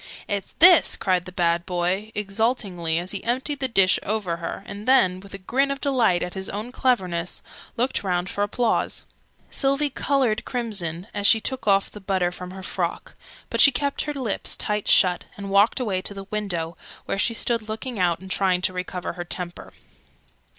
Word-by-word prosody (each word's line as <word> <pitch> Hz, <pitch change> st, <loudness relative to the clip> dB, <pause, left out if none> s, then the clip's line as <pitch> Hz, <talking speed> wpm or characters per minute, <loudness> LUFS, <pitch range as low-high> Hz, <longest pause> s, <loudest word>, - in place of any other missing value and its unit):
"It's 200 Hz, -2 st, -3 dB
this!" 350 Hz, 0 st, +7 dB
cried 185 Hz, -2 st, +1 dB
the 180 Hz, -, -8 dB
bad 170 Hz, -1 st, +1 dB
boy, 180 Hz, +4 st, -1 dB
exultingly, 200 Hz, -5 st, -1 dB
as 175 Hz, +2 st, -3 dB
he 200 Hz, -, -4 dB
emptied 260 Hz, +4 st, -1 dB
the 265 Hz, -, 0 dB
dish 195 Hz, -6 st, +4 dB
over 200 Hz, -5 st, -2 dB
her, 170 Hz, -, -5 dB
and 200 Hz, +3 st, -8 dB
then, 185 Hz, -9 st, +4 dB
with 195 Hz, +1 st, -11 dB
a -, -, -5 dB
grin 260 Hz, +9 st, 0 dB
of 275 Hz, 0 st, -2 dB
delight 245 Hz, -11 st, +2 dB
at 180 Hz, -, -5 dB
his 190 Hz, 0 st, -3 dB
own 215 Hz, +4 st, -5 dB
cleverness, 185 Hz, -10 st, -1 dB, 0.3 s
looked 250 Hz, +3 st, +1 dB
round 180 Hz, -2 st, 0 dB
for 205 Hz, -, -1 dB
applause. 225 Hz, +3 st, 0 dB, 0.5 s
Sylvie 275 Hz, +1 st, +1 dB
coloured 265 Hz, -6 st, +1 dB
crimson, 195 Hz, -9 st, -3 dB
as 205 Hz, -1 st, +1 dB
she 225 Hz, -, +6 dB
shook 260 Hz, +1 st, -3 dB
off 195 Hz, -1 st, +3 dB
the 210 Hz, -, -10 dB
butter 185 Hz, -2 st, 0 dB
from 180 Hz, 0 st, -8 dB
her 190 Hz, +1 st, -9 dB
frock: -, -, -3 dB, 0.4 s
but -, -, +2 dB
she 280 Hz, -, +8 dB
kept 280 Hz, +2 st, -1 dB
her 295 Hz, -, -3 dB
lips 250 Hz, -7 st, -1 dB
tight 210 Hz, -1 st, -2 dB
shut, 180 Hz, -2 st, +4 dB
and 200 Hz, -1 st, -6 dB
walked 200 Hz, +6 st, +4 dB
away 200 Hz, -7 st, -1 dB
to 200 Hz, -, -2 dB
the 195 Hz, 0 st, -7 dB
window, 175 Hz, -6 st, -2 dB, 0.3 s
where 195 Hz, -, -2 dB
she 230 Hz, +2 st, +2 dB
stood 230 Hz, -2 st, 0 dB
looking 225 Hz, +1 st, -5 dB
out 175 Hz, -2 st, +2 dB
and 190 Hz, 0 st, -7 dB
trying 185 Hz, -2 st, +2 dB
to 185 Hz, -, +1 dB
recover 180 Hz, -1 st, -4 dB
her 175 Hz, 0 st, -5 dB
temper. 175 Hz, 0 st, -4 dB
200 Hz, 190 wpm, -24 LUFS, 180-235 Hz, 0.5 s, she